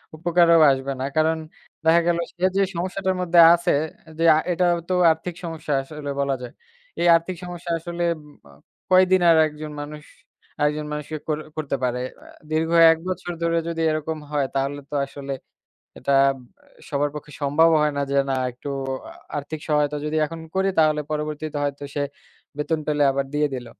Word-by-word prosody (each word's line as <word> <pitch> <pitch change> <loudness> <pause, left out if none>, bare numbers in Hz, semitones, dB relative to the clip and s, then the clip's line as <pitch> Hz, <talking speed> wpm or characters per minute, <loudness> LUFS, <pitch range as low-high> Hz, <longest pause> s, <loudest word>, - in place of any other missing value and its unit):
উপকারও 170 0 +4
আসবে 135 +1 -2
না। - - -2
কারণ 160 +1 +2 0.5
দেখা 165 +1 +5
গেল 170 0 +2 0.2
সে 180 +1 -1
যে - - +4
সমস্যাটার 185 +2 -1
মধ্যে 175 -1 +3
আছে 170 0 +1 0.5
যে, 165 - -1
আ - - +3
এটা 180 +1 +1 0.2
তো 185 - -1 0.2
আর্থিক 165 +2 -4
সমস্যা 160 -3 -4
আসলে 145 +1 -8
বলা 140 -1 +1
যায়। 125 - -7 0.5
এই 175 - +2
আর্থিক 170 +2 -1
সমস্যা 175 -1 -6
আসলে 175 +1 -4 0.2
উম 150 -1 -17 0.2
আ - - -16 0.4
কয়দিন 185 0 +5
আর 165 - +6
একজন 150 0 -8
মানুষ, 150 0 -8 0.6
আরেকজন 150 +1 0
মানুষকে 150 +1 -5
করে-করতে 155 -1 -3
পারে? 125 0 0 0.2
অ্যা - - -16 0.2
দীর্ঘ 160 +1 +1 0.2
১ 165 - +1
বছর 185 -1 -3
ধরে 170 0 +1
যদি 165 -1 -3
এরকম 155 +1 -2
হয়, 145 -2 +1
তাহলে 140 +1 -1
তো 150 - -3
আসলে 140 0 -6 0.7
এটা 140 +2 -1 0.2
আব 135 - -5 0.5
সবার 145 0 0
পক্ষে 150 0 -9
সম্ভব 150 +4 +4
হয় 150 -1 +1
না - - 0
যে, 140 - -1 0.2
"না, - - +1 0.2
একটু 125 +4 -10 0.7
আর্থিক 150 +2 -6
সহায়তা 150 -1 +1
যদি 155 - -2
এখন 165 +1 -8
করি? 190 +1 +2
তাহলে 155 -1 +4
পরবর্তীতে 150 0 -3
হয়তো 140 0 -3
সে 145 - -1 0.5
বেতন 155 +1 -1
পেলে 150 -1 +1
আবার 140 0 -1
দিয়ে 150 0 +2
দিল।" 125 -2 -6
155 Hz, 175 wpm, -23 LUFS, 145-170 Hz, 0.7 s, আর